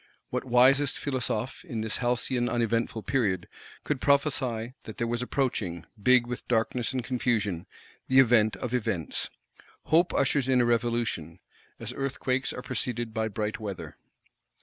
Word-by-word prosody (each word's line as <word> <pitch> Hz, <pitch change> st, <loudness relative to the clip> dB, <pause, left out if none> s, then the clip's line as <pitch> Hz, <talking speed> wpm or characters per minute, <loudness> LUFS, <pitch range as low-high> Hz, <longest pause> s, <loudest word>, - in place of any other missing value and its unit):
—What 125 Hz, +1 st, -2 dB
wisest 130 Hz, +3 st, +4 dB
Philosophe, 130 Hz, -2 st, -2 dB
in 120 Hz, -11 st, -4 dB
this 110 Hz, -1 st, -2 dB
halcyon 120 Hz, 0 st, 0 dB
uneventful 115 Hz, -2 st, 0 dB
period, 100 Hz, -9 st, 0 dB, 0.4 s
could 145 Hz, -3 st, -2 dB
prophesy 130 Hz, -5 st, +1 dB
that 110 Hz, -, -8 dB
there 120 Hz, -, 0 dB
was 120 Hz, +1 st, -1 dB
approaching, 105 Hz, -, -1 dB, 0.2 s
big 125 Hz, +1 st, +5 dB
with 125 Hz, 0 st, -6 dB
darkness 120 Hz, +1 st, +1 dB
and 130 Hz, -2 st, -2 dB
confusion, 115 Hz, -8 st, -1 dB, 0.4 s
the 130 Hz, -, +3 dB
event 120 Hz, -4 st, +5 dB
of 125 Hz, -2 st, -5 dB
events? 95 Hz, -, -2 dB, 0.5 s
Hope 170 Hz, +3 st, +3 dB
ushers 135 Hz, -1 st, +2 dB
in 130 Hz, -1 st, +4 dB
a 120 Hz, -, +4 dB
Revolution,—as 115 Hz, -2 st, -3 dB
earthquakes 135 Hz, -1 st, -1 dB
are 125 Hz, -, -6 dB
preceded 120 Hz, -2 st, -3 dB
by 110 Hz, -1 st, 0 dB
bright 105 Hz, 0 st, -3 dB
weather. 95 Hz, -8 st, -6 dB
120 Hz, 140 wpm, -28 LUFS, 110-130 Hz, 0.5 s, big